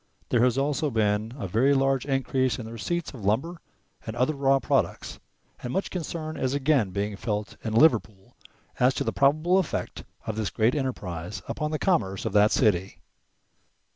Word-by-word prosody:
There 120 -1 +3
has 125 0 +2
also 145 +2 0
been 110 -2 0
a 100 - -4
very 125 +9 +3
large 135 0 +1
increase 135 -1 0
in 120 - -6
the 110 - -8
receipts 170 +10 -3
of 120 -6 -10
lumber 145 - -1 0.5
and 110 - -4
other 125 +5 +1
raw 135 -1 +3
products, - - -1 0.4
and 125 - -4
much 190 - -2
concern 160 -3 -4
is 130 0 -1
again 140 -6 +2
being 100 +2 -3
felt 105 0 -3
in 110 - -3
Liverpool 110 -8 +2 0.4
as 125 +2 +4
to - - -1
the - - -2
probable 155 +7 +3
effect 185 - -3 0.2
of 110 - -4
this 110 -2 -1
great 110 +3 +2
enterprise 95 - -4
upon 150 - -2
the 155 - -1
commerce 105 - 0
of - - -2
that 105 +1 +5
city. 95 -5 +1
125 Hz, 175 wpm, -26 LUFS, 105-145 Hz, 0.5 s, that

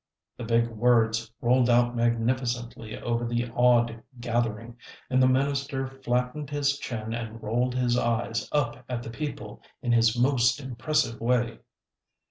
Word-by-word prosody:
The 120 - -7
big 115 0 +2
words 115 -1 +2
rolled 125 0 +3
out 120 0 +3
magnificently 120 0 -1
over 120 0 -1
the 120 0 -1
awed 120 -2 +3 0.2
gathering, 115 -1 -2 0.3
and 130 0 +3
the 130 - +6
minister 140 +1 0
flattened 130 +2 -2
his 145 -1 0
chin 110 -4 -5
and 115 -1 -5
rolled 120 +4 0
his 125 -1 +2
eyes 115 -1 -1
up 130 -4 -1
at 120 -1 -3
the 115 - -7
people 115 -5 -6 0.2
in 120 - 0
his 115 0 +4
most 125 0 +3
impressive 135 0 -1
way. 115 -1 +1
120 Hz, 140 wpm, -27 LUFS, 115-130 Hz, 0.3 s, the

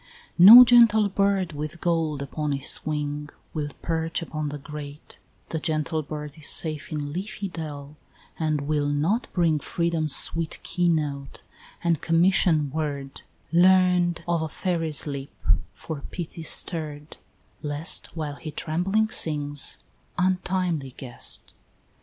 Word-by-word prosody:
V. 175 - +8
No 240 +5 +12
gentle 230 -4 +6
bird 195 -3 +1
with 150 +3 -6
gold 160 -4 0
upon 150 +1 -3
its 140 +1 -2
wing 150 -1 -3 0.2
Will 150 -2 -3
perch 165 0 -1
upon 155 -2 -4
the 145 - -5
grate 150 0 -10 0.3
the 160 - -2
gentle 155 0 -1
bird 150 0 -7
Is 150 - -8
safe 155 -2 +1
in 145 -2 -4
leafy 200 +3 -4
dell, 150 -4 -7 0.4
and 155 -2 0
will 145 0 0
not 155 - 0
bring 165 -4 +2
Freedom's 165 -2 0
sweet 165 -1 -1
key 175 -1 0
note 145 -4 -2 0.4
and 170 -3 +1
commission 165 -3 +3
word 145 -3 -4 0.3
Learn'd 180 0 +4
of 170 -1 +1
a 160 - -3
fairy's 165 -5 -1
lips, 140 -2 -6 0.4
for 155 -3 -7
pity 170 -2 -6
stirr'd 155 -2 -2 0.4
Lest 150 +2 0
while 150 -2 -4
he 155 - -7
trembling 185 +9 0
sings, 145 -6 -1 0.4
untimely 180 -6 -1
guest! 125 -3 -3
155 Hz, 130 wpm, -25 LUFS, 145-175 Hz, 0.4 s, No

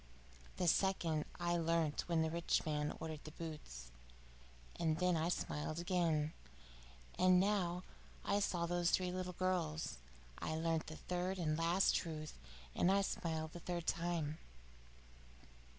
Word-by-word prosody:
The 180 - +1
second 170 -4 +2
I 175 0 +1
learnt 165 -2 +1
when 165 -2 +3
the 160 - 0
rich 170 +1 +1
man 150 -1 -1
ordered 155 -2 -5
the - - -7
boots, 150 - -7 0.9
and 160 -2 +2
then 180 0 +3
I 165 +1 +1
smiled 155 -2 -2
again. 170 -3 +1 0.9
And 185 0 +6
now, 185 -3 +1 0.4
when 200 - +2
I - - +3
saw 175 -4 +1
those 175 0 +2
little 180 0 -2
girls, 165 - -1 0.4
I 155 - -2
learn 165 0 +1
the 155 - -6
third 180 +3 -2
and 155 -4 +1
last 170 +4 +3
truth, 155 - -3 0.3
and 180 - +3
I 200 +1 +4
smiled 160 -4 -2
the 175 - -8
third 175 -1 -3
time." 165 -3 -1
170 Hz, 140 wpm, -38 LUFS, 155-180 Hz, 0.9 s, And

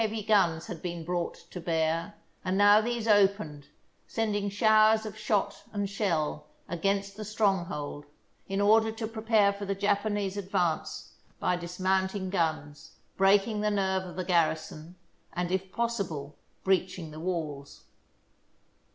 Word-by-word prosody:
Many 220 -1 0
heavy 215 -2 -4
guns 175 -6 +3
had 180 -7 -7
been 170 -2 -4
brought 175 +1 -2 0.2
to 180 - -6
bear, 165 +3 0 0.3
and 185 0 0
now 205 +1 +7
these 235 0 -2
opened, 195 -9 +2 0.4
sending 205 -2 -1
showers 215 +1 +4
of 215 -1 -6
shot 210 -2 -1
and 205 -1 -1
shell 165 -7 -1 0.2
against 195 +3 -1
the 215 - -6
stronghold 190 -8 -1 0.4
in 195 +1 -1
order 220 +2 +4
to 225 0 -5
prepare 220 -2 +2
for 200 0 -6
the 195 0 -1
Japanese 205 0 0
advance 185 -4 -2 0.3
by 180 - +1
dismounting 190 +2 -1
guns, 155 -5 -2 0.2
breaking 200 +2 +3
the 210 - +2
nerve 190 -2 +1
of 185 -1 -9
the 185 0 -3
garrison, 165 -1 0 0.4
and, 180 0 -2
if 190 0 -2
possible, 185 -12 -3 0.3
breaching 185 -3 0
the 155 - -9
walls. 155 -5 -4
195 Hz, 140 wpm, -29 LUFS, 170-210 Hz, 0.4 s, now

